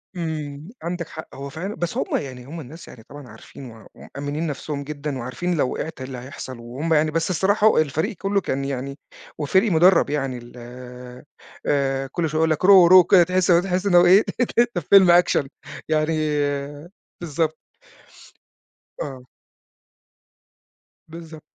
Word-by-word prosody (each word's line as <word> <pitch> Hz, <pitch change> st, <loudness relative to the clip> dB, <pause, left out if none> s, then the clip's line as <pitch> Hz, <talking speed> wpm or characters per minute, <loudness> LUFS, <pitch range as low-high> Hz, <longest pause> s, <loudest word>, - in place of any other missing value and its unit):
إمم، 155 Hz, -2 st, -5 dB
عندك 170 Hz, 0 st, -4 dB
حق. 160 Hz, -, -10 dB
هو 140 Hz, +1 st, -7 dB
فعلًا 180 Hz, +8 st, -6 dB
بس 175 Hz, -1 st, -4 dB
هُم -, -, -1 dB
يعني 130 Hz, -3 st, -7 dB
هُم 160 Hz, +5 st, -8 dB
الناس 160 Hz, +3 st, -11 dB
يعني 110 Hz, -, -13 dB
طبعًا 145 Hz, +2 st, -12 dB
عارفين 130 Hz, -3 st, -12 dB
و 110 Hz, 0 st, -15 dB
ومأمّنين 145 Hz, +3 st, -5 dB
نفْسهم 145 Hz, 0 st, -5 dB
جدًا 145 Hz, -1 st, -5 dB
وعارفين 130 Hz, +9 st, -3 dB
لو 135 Hz, -4 st, 0 dB
وقعت 160 Hz, -2 st, -6 dB
إيه 130 Hz, -, -6 dB
اللي 130 Hz, -1 st, -7 dB
هيحصل، 130 Hz, 0 st, -9 dB
وهُم 130 Hz, +8 st, -3 dB
يعني 155 Hz, 0 st, +2 dB
بس 165 Hz, +2 st, -1 dB
الصراحة 200 Hz, +4 st, +2 dB
الفريق 155 Hz, +5 st, 0 dB
كلّه 195 Hz, +3 st, -1 dB
كان 135 Hz, -4 st, -3 dB
يعني 140 Hz, 0 st, -5 dB, 0.4 s
وفريق 190 Hz, +8 st, +1 dB
مُدرَّب 170 Hz, -1 st, +4 dB
يعني 135 Hz, -3 st, -2 dB
ال 120 Hz, 0 st, -13 dB, 1.1 s
آآ، 135 Hz, -1 st, 0 dB
كل 165 Hz, 0 st, -1 dB
شوية 155 Hz, +1 st, -2 dB
يقول 160 Hz, 0 st, +2 dB
لك 155 Hz, -, -1 dB
Row, 190 Hz, -3 st, +8 dB
row -, -, +8 dB
وكده 185 Hz, 0 st, +7 dB
تحس 180 Hz, 0 st, 0 dB
تحس 180 Hz, +2 st, +2 dB
إن 195 Hz, -3 st, +2 dB
هو 175 Hz, 0 st, +7 dB
إيه 190 Hz, +4 st, +6 dB, 0.2 s
أنت 245 Hz, -, 0 dB, 0.3 s
في -, -, -9 dB
فيلم 190 Hz, -3 st, +7 dB
أكشن 175 Hz, -5 st, +3 dB, 0.4 s
يعني 155 Hz, +1 st, +1 dB, 1.0 s
بالضبط. 160 Hz, -1 st, -2 dB, 1.4 s
آه. 130 Hz, -3 st, -6 dB, 1.8 s
بالضبط. 160 Hz, -1 st, -11 dB
155 Hz, 155 wpm, -22 LUFS, 140-175 Hz, 1.8 s, Row